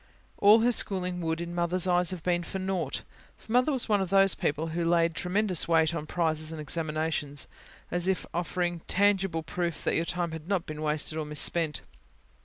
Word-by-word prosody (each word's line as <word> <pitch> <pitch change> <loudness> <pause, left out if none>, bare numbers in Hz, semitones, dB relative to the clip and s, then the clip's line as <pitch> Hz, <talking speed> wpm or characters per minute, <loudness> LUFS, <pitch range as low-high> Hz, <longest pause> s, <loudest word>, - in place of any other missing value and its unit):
All 210 +3 +7
her 240 +2 +4
schooling 180 -5 0
would, 160 0 -1
in 170 0 -5
Mother's 175 +1 0
eyes, 180 -1 +2
have 185 -4 -4
been 175 -1 +1
for 175 - -6
naught. 185 -6 -2 0.3
For - - -13
Mother 250 +5 +3
was 260 -4 0
one 205 -2 +2
of 190 - -2
those 195 0 +4
people 155 +3 -1
who 170 +2 -2
laid 165 0 +2
tremendous 180 +1 0
weight 165 -1 +3
on 155 -2 -4
prizes 155 -2 0
and 160 - -6
examinations, 155 -2 -2 0.4
as 175 +1 +1 0.2
offering 175 0 -1
a - - -32
tangible 195 -4 +2
proof 170 +1 -3
that - - +1
your 165 - +1
time 175 -1 -1
had 160 0 -8
not 190 -3 0
been 155 0 -7
wasted 155 +1 -1
or 155 - -3
misspent. 150 +1 +1
170 Hz, 195 wpm, -28 LUFS, 160-185 Hz, 0.4 s, All